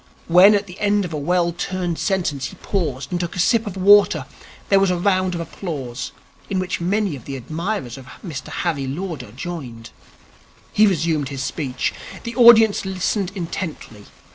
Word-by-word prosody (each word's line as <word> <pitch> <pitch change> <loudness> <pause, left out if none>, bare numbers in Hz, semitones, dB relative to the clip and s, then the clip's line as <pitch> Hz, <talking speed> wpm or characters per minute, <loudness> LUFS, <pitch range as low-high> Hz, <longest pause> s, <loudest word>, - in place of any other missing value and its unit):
When, 185 +5 +7
at 200 0 0
the 180 -1 -12
end 205 -1 +2
of 170 - -6
a - - -2
well 170 +3 +1
turned 175 -1 -3
sentence, 170 -9 -1
he - - -11
paused 155 -9 -3
and 175 - -1
took 175 -1 -4
a - - -4
sip 225 +4 +2
of 195 -2 -6
water, 205 +2 +5 0.4
there 195 - +5
was 195 -1 +3
a 180 - +1
round 185 0 +1
of 170 - -3
applause, 140 -8 -5 0.4
in 195 - -1
which 185 -1 -2
many 195 -1 0
of 130 - -12
the 140 - -5
admirers 155 - -4
of 130 - -13 0.2
Mr 155 -6 -6
Harry 150 -6 -2
Lauder 145 - -5
joined. 125 -5 -7 0.8
He 215 +1 +5
resumed 160 -6 0
his 135 -2 -4
speech. 130 -6 -2 0.3
The 235 0 -6
audience 230 -3 +7
listened 190 0 -1
intently. 165 - -6
175 Hz, 175 wpm, -21 LUFS, 145-195 Hz, 0.8 s, When